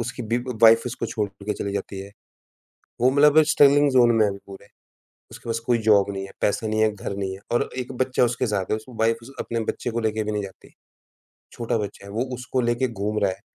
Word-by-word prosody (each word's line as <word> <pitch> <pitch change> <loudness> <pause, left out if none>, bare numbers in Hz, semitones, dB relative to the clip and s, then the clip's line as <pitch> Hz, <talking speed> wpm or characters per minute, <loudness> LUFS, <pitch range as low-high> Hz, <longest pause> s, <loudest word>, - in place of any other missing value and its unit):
उसकी 120 +1 -5
बि 120 - +3 0.2
वाइफ 115 0 +7
उसको 120 -1 -4
छोड़ 105 -2 -2 0.2
के 105 - -1
चली 100 0 -4
जाती 100 -1 -5
है, 100 +1 -9 0.9
वो 125 +2 +4
मतलब 150 +2 +5
स्ट्रगलिंग 145 -1 +5
जोन 120 -2 +5
में 110 - +4
है 105 - +1
अभी 100 - -7
पूरे। 100 +1 -12 0.6
उसके 115 - -10
पास 115 0 -1
कोई 120 -1 +3
जॉब 100 -2 +5
नहीं 95 0 -5
है, 95 - -12
पैसे 105 +2 0
नहीं 110 0 0
है, 110 - +3
घर 100 0 -5
नहीं 95 -1 -3
है 95 - -9
और 120 - +1
1 125 0 -4
बच्चा 130 -1 +1
उसके 120 +1 -1
साथ 100 -2 -2
है - - +3
उसकी 110 +4 -10
वाइफ 115 0 +2
उस 135 - -12
अपने 115 0 -3
बच्चे - - -3
को 115 - -2
लेके 110 0 -2
भी 105 - -3
नहीं 105 -1 -2
जाती। 95 -1 -12 0.8
छोटा 115 0 -2
बच्चा 100 -1 -6
है - - -10
वो 115 +4 -1
उसको 130 +1 -2
लेके 120 +2 0
घूम 105 -1 -3
रहा 100 - +3
है, 95 +1 -8
115 Hz, 240 wpm, -23 LUFS, 100-120 Hz, 0.9 s, वाइफ